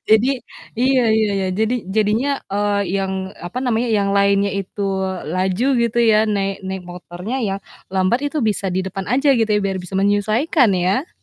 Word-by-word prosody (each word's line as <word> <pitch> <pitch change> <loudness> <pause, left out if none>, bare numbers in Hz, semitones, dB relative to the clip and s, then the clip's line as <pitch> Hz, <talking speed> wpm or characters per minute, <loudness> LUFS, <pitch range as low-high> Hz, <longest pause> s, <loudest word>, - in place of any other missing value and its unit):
jadi 220 +4 +5 0.5
iya 260 +2 +3 0.2
iya 220 -1 +2
iya. 190 -1 -1
Jadi 220 +3 +1 0.2
jadinya, 215 +6 +2 0.2
eee, 205 0 +1 0.2
yang 190 0 -2 0.3
apa 185 - -5
namanya 240 0 0
yang 200 -3 +1
lainnya 200 0 +3
itu 195 +1 -5 0.5
laju 185 +5 0 0.2
gitu 235 0 0
ya 215 - +5
naik 195 -1 -1
naik 190 0 -4
motornya 180 +5 -6
ya 195 - -1 0.4
lambat 190 +6 +2
itu 305 - -3
bisa 200 -2 -1
di 185 +1 -1
depan 190 0 -5
aja 275 +3 +2
gitu 230 -4 +1
ya 210 -1 +2
biar 195 -1 -1
bisa 180 +1 -6
menyesuaikan 215 - +2
ya. 190 - 0
205 Hz, 170 wpm, -20 LUFS, 190-230 Hz, 0.5 s, jadi